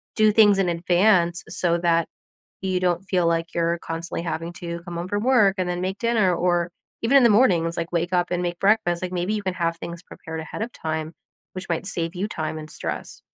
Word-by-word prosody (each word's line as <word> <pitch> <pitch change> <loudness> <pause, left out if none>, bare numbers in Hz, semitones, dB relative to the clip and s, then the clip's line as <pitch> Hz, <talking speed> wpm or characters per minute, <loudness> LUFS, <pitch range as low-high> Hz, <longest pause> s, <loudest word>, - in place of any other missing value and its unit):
do 215 -1 +5
things 205 -2 +5
in 185 -2 +2
advance 175 +1 +2
so 170 0 0
that 170 -1 +2 0.6
you 185 -1 0
don't 180 0 0
feel 185 -3 +1
like 165 +1 0
you're 170 0 +1
constantly 165 +1 -4
having 165 0 -4
to 170 0 -6
come 175 -2 -7
home 170 +2 -4
from 205 +2 -1
work 225 -7 +4
and 185 -1 0
then 175 0 -2
make 190 +2 -2
dinner, 220 -5 +2
or 175 0 +1 0.3
even 240 +5 +4
in - - +5
the - - +7
mornings, 175 -7 +3
like, 170 0 -4
wake 175 +1 -1
up 175 0 +1
and 180 0 -1
make 175 0 -3
breakfast, 195 -4 +2
like, 180 0 -3
maybe 180 +3 -1
you 210 - -2
can 185 -2 -2
have 170 -2 -1
things 170 0 -7
prepared 160 -2 -8
ahead 160 +6 -6
of 235 +2 -4
time, 160 0 -4 0.4
which 185 0 -7
might 170 +1 -1
save 170 -3 -3
you 185 +3 -2
time 155 -4 -4
and 155 0 -9
stress. - - -6
175 Hz, 225 wpm, -24 LUFS, 170-190 Hz, 0.6 s, the